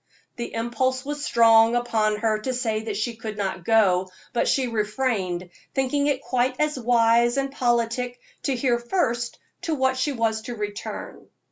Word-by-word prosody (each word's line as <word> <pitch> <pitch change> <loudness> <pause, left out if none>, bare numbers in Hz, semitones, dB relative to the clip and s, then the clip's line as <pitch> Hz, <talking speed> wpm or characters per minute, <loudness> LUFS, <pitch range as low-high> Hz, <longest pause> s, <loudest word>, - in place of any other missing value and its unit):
The 235 - -5
impulse 255 +3 -1
was 290 0 -4
strong 230 -2 +5
upon 220 -3 +1
her 215 0 0
to 255 +4 -3
say 225 -3 -1
that 215 -3 -3
she 230 +2 -2
could 215 -2 -6
not 190 -3 -3
go, 190 -3 +3 0.2
but 240 - +1
she 265 - +2
refrained, 210 -5 -1 0.2
thinking 275 +2 +1
it 275 -2 0
quite 255 0 0
as 300 -2 0
wise 235 +1 +3
and 275 0 0
politic 245 -1 0 0.2
to 270 - 0
hear 240 -1 +1
first 240 -4 -1 0.2
to 320 - -1
what 260 -1 +1
she 290 - +1
was 225 -4 0
to 240 +2 -6
return. 205 -1 -6
235 Hz, 165 wpm, -24 LUFS, 220-260 Hz, 0.2 s, strong